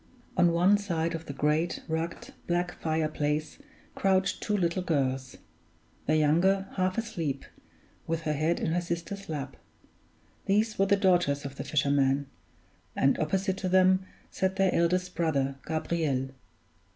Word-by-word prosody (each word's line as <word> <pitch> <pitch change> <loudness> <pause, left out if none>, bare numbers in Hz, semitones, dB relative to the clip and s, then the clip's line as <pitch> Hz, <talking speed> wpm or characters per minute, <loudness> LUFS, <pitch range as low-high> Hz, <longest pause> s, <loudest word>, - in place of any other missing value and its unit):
On 175 -2 +4
one 180 +5 +4
side 170 -4 -1
of 165 0 -6
the - - -4
great, 150 +4 0
rugged, 170 +11 -4
black 175 0 0
fire 160 -1 +1
place 150 0 -2 0.3
crouched 190 -1 +1
two 210 -1 0
little 175 0 0
girls; 135 -6 -1 0.7
the 155 - +3
younger 180 +6 +3
half 185 -1 0
asleep, 170 -12 -3 0.6
with 165 0 -1
her 155 - 0
head 155 +3 0
in 160 - -1
her 175 +2 +1
sister's 170 +3 -5
lap. 145 -4 -5 0.9
These 215 +2 +1
were 195 - +4
the 200 - +5
daughters 175 -8 +2
of 140 0 -7
the - - -4
fisherman; 140 -1 +2 0.7
and 135 - +2
opposite 190 +4 0
to 185 -1 -2
them 185 0 +4 0.3
sat 190 0 0
their 195 -1 +2
eldest 180 +2 +1
brother, 140 -5 0
Gabriel. 155 -4 -1
170 Hz, 145 wpm, -28 LUFS, 150-190 Hz, 0.9 s, the